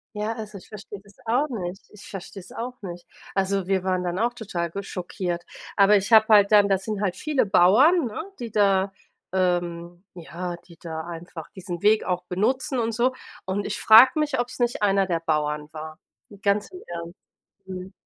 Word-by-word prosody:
Ja, 210 +2 -2
also 215 -3 -7
ich - - -16
verstehe 205 -1 -9
das 200 -1 -19
auch 250 +7 +1
nicht. 190 -4 -5
Ich 210 - -12
verstehe 195 0 -8
es 185 - -14
auch 245 +2 -5
nicht. 175 -2 -8 0.3
Also, 195 -1 0
wir 190 -1 +1
waren 185 -1 0
dann 180 +1 -2
auch 240 +2 +1
total 185 -7 -3
ge 200 +3 -5
schockiert, 175 -2 -4 0.3
aber, 205 +1 +6
ich 200 +3 -1
habe 220 -1 +8
halt 200 -1 +6
dann 205 -1 +6
das 190 -1 +1
sind 215 -2 -3
halt 195 -4 0
viele 295 -3 0
Bauern, 245 - +5
ne? 220 +6 -5 0.2
Die 235 - -5
da 195 -2 +2 0.4
ähm, 175 -1 -1
ja, 175 +1 -6
die 170 -2 -16
da 160 -1 -5
einfach 165 -1 -8
diesen 175 -2 -6
Weg 215 +1 +4
auch 180 -1 -2
benutzen 255 - 0
und 230 0 0
so. 245 +3 +1 0.3
Und 195 +2 -2
ich - - -3
frage 245 +7 +8
mich, 295 -3 +1
ob 245 - -1
es - - -10
nicht 240 -3 0
einer 195 -1 +3
der 170 -2 -1
Bauern 150 -2 -1
war. 155 +1 -8 0.4
Ganz 200 +1 +1
im 365 - -10
Ernst. 170 0 -6 0.5
Mhm. 185 0 -7
195 Hz, 195 wpm, -24 LUFS, 175-220 Hz, 0.5 s, habe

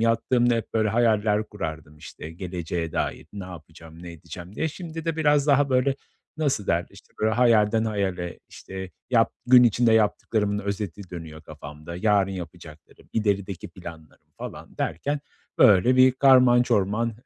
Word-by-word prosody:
Yattığımda 120 +1 +2
hep, 115 - -4
böyle, 110 -1 +2
hayaller 110 -2 +2
kurardım, 80 -6 -7
işte, 75 +1 -10
geleceğe 85 -2 -5
dair - - -3
ne 100 -2 -7
yapacağım, 80 -1 -12
ne 85 -1 -8
edeceğim 85 +3 -11
diye. 160 - -1
Şimdi 165 0 -8
de 165 -1 -2
biraz 150 -2 +2
daha, 140 -1 +3
böyle, 130 +2 +2 0.4
nasıl 140 - -1
derler, 85 +1 0
işte, - - -18
böyle, 110 +1 +2
hayalden 115 -2 +3
hayale, 95 -5 -3
işte, 95 -1 -9 0.2
yap - - +3
gün 125 0 +8
içinde 120 0 +3
yaptıklarımın 105 -1 +1
özeti 100 -2 -5
dönüyor 80 -3 -9
kafamda, 75 +2 -10
yarın 100 0 +2
yapacaklarım, 85 -4 -11
ilerideki 100 -4 -2
planlarım 80 -2 -12
falan - - -9
derken 145 - -2 0.4
böyle 105 +7 +5
bir 130 0 +6
karman 130 -2 +5
çorman 115 0 0
105 Hz, 145 wpm, -24 LUFS, 85-120 Hz, 0.4 s, gün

